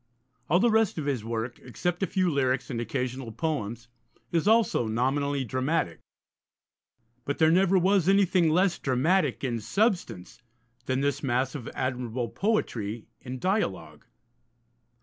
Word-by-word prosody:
All 175 Hz, +4 st, +4 dB
the 235 Hz, +3 st, +3 dB
rest 220 Hz, -4 st, +2 dB
of 155 Hz, -, -3 dB
his 135 Hz, -6 st, -1 dB
work, 115 Hz, +1 st, -4 dB
except 175 Hz, -, -3 dB
a 195 Hz, -, +1 dB
few 185 Hz, -2 st, +1 dB
lyrics 135 Hz, -2 st, 0 dB
and 115 Hz, -2 st, -2 dB
occasional 125 Hz, +1 st, -3 dB
poems, 115 Hz, -4 st, -3 dB, 0.4 s
is 165 Hz, +2 st, +1 dB
also 220 Hz, -, +3 dB
nominally 135 Hz, +4 st, 0 dB
dramatic. 130 Hz, -, -1 dB, 1.2 s
But 145 Hz, -, -3 dB
there 160 Hz, 0 st, +4 dB
never 190 Hz, +2 st, +4 dB
was 190 Hz, 0 st, +3 dB
anything 190 Hz, -4 st, +4 dB
less 180 Hz, +3 st, +2 dB
dramatic 145 Hz, +3 st, +1 dB
in 120 Hz, -3 st, -1 dB
substance 175 Hz, -, -1 dB, 0.5 s
than 130 Hz, +1 st, 0 dB
this 145 Hz, 0 st, 0 dB
mass 130 Hz, 0 st, 0 dB
of 140 Hz, -6 st, -6 dB
admirable 125 Hz, -2 st, -2 dB
poetry 115 Hz, -, -2 dB
in 130 Hz, 0 st, -7 dB
dialogue. 185 Hz, -, -2 dB
140 Hz, 135 wpm, -27 LUFS, 120-180 Hz, 1.2 s, All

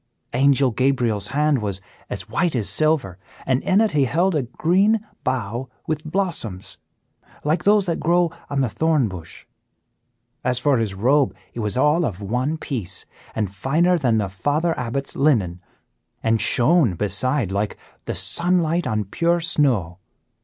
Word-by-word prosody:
Angel 135 Hz, 0 st, +3 dB
Gabriel's 120 Hz, -4 st, +1 dB
hand 150 Hz, -2 st, +1 dB
was 100 Hz, -3 st, -2 dB, 0.3 s
as -, -, -5 dB
white 170 Hz, -4 st, 0 dB
as 110 Hz, -5 st, -1 dB
silver, 150 Hz, -, +1 dB, 0.3 s
and 130 Hz, 0 st, +1 dB
in 190 Hz, -, +2 dB
it 220 Hz, -1 st, +3 dB
he 145 Hz, -4 st, +2 dB
held 170 Hz, +9 st, +1 dB
a 150 Hz, -, +1 dB
green 185 Hz, -, +2 dB, 0.2 s
bough 125 Hz, 0 st, -2 dB, 0.2 s
with 155 Hz, -1 st, -2 dB
blossoms, 155 Hz, -, -3 dB, 0.6 s
like 155 Hz, +4 st, 0 dB
those 205 Hz, -1 st, +4 dB
that 170 Hz, -3 st, -1 dB
grow 170 Hz, +1 st, +2 dB, 0.2 s
on 140 Hz, -1 st, 0 dB
the 130 Hz, -, +2 dB
thorn 150 Hz, +2 st, +1 dB
bush. 90 Hz, -5 st, -9 dB, 1.0 s
As 125 Hz, -1 st, 0 dB
for 140 Hz, -2 st, +2 dB
his 105 Hz, -4 st, -2 dB
robe, 125 Hz, -1 st, +2 dB, 0.2 s
it -, -, -7 dB
was 105 Hz, +1 st, -2 dB
all 150 Hz, +6 st, +3 dB
of 100 Hz, -, -3 dB
one 125 Hz, +9 st, -1 dB
piece, 115 Hz, -, -3 dB, 0.3 s
and 105 Hz, -4 st, -2 dB
finer 160 Hz, -, +2 dB
than 125 Hz, -9 st, +1 dB
the 105 Hz, -2 st, 0 dB
Father 145 Hz, -, 0 dB
Abbot's 125 Hz, +3 st, -3 dB
linen, 105 Hz, -, +1 dB, 0.6 s
and 115 Hz, -1 st, +2 dB
shone 135 Hz, -, +4 dB
beside 105 Hz, -, 0 dB
like 100 Hz, +2 st, -2 dB, 0.3 s
the -, -, -3 dB
sunlight 170 Hz, -, +1 dB
on 110 Hz, -1 st, 0 dB
pure 170 Hz, -, +1 dB
snow. 130 Hz, -, 0 dB
135 Hz, 155 wpm, -22 LUFS, 105-160 Hz, 1.0 s, those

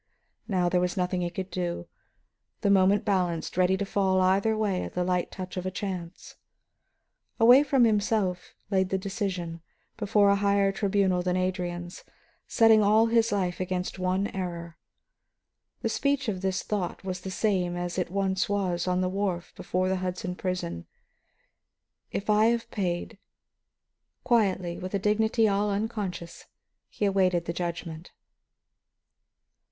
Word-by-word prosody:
Now 185 Hz, -4 st, +1 dB
there 180 Hz, 0 st, +2 dB
was 180 Hz, +2 st, -1 dB
nothing 180 Hz, 0 st, 0 dB
he 175 Hz, -, -1 dB
could 185 Hz, +1 st, -6 dB
do; 175 Hz, -1 st, -3 dB, 0.7 s
the 200 Hz, -, +2 dB
moment 195 Hz, +1 st, +4 dB
balanced, 180 Hz, -5 st, 0 dB
ready 185 Hz, +1 st, +3 dB
to 200 Hz, -, -2 dB
fall 190 Hz, -1 st, +1 dB
either 195 Hz, +4 st, +2 dB
way 200 Hz, -4 st, 0 dB
at -, -, -7 dB
the 180 Hz, -, +1 dB
light 180 Hz, -1 st, 0 dB
touch 185 Hz, 0 st, -7 dB
of 185 Hz, +1 st, -2 dB
chance. 180 Hz, -3 st, -6 dB, 1.0 s
Away 245 Hz, +4 st, +8 dB
from 270 Hz, -3 st, +3 dB
himself 205 Hz, -4 st, 0 dB
he 200 Hz, -, -6 dB
laid 190 Hz, -1 st, +2 dB
the 190 Hz, -, 0 dB
decision, 185 Hz, -4 st, -4 dB, 0.4 s
before 205 Hz, -1 st, +3 dB
a 200 Hz, -, +3 dB
higher 200 Hz, 0 st, +2 dB
tribunal 195 Hz, -2 st, +1 dB
than 180 Hz, 0 st, 0 dB
Adrian's, 175 Hz, -1 st, -3 dB, 0.4 s
setting 225 Hz, -2 st, +5 dB
all 215 Hz, +2 st, +5 dB
his 230 Hz, 0 st, +2 dB
life 185 Hz, -3 st, -1 dB
against 185 Hz, 0 st, -3 dB
one 185 Hz, +2 st, 0 dB
error. 170 Hz, -3 st, -5 dB, 1.1 s
The -, -, +1 dB
speech 280 Hz, -2 st, 0 dB
of 190 Hz, -4 st, -2 dB
his 190 Hz, 0 st, -1 dB
thought 195 Hz, -4 st, -3 dB
was 185 Hz, -1 st, -4 dB
the 190 Hz, -, -6 dB
same 185 Hz, -3 st, 0 dB
as 175 Hz, +1 st, -3 dB
it 180 Hz, -, -1 dB
once 190 Hz, 0 st, 0 dB
was 185 Hz, -4 st, -1 dB
on 180 Hz, 0 st, +1 dB
the 185 Hz, -, +1 dB
wharf 185 Hz, -2 st, -2 dB
before 185 Hz, +1 st, -1 dB
the 190 Hz, 0 st, 0 dB
Hudson 180 Hz, 0 st, -3 dB
prison: 180 Hz, -, -4 dB, 1.2 s
"If 200 Hz, -, -4 dB
I 210 Hz, 0 st, +4 dB
have 235 Hz, 0 st, 0 dB
paid 180 Hz, -1 st, -3 dB, 0.5 s
" -, -, -56 dB
Quietly, 190 Hz, -7 st, +1 dB
with 185 Hz, +2 st, -4 dB
a -, -, +3 dB
dignity 220 Hz, +3 st, +2 dB
all 205 Hz, +1 st, +1 dB
unconscious, 200 Hz, -5 st, -4 dB, 0.4 s
he 210 Hz, -, -2 dB
awaited 185 Hz, -3 st, +2 dB
the 170 Hz, -, -3 dB
judgment. 170 Hz, -1 st, -5 dB
190 Hz, 150 wpm, -27 LUFS, 180-205 Hz, 1.2 s, Away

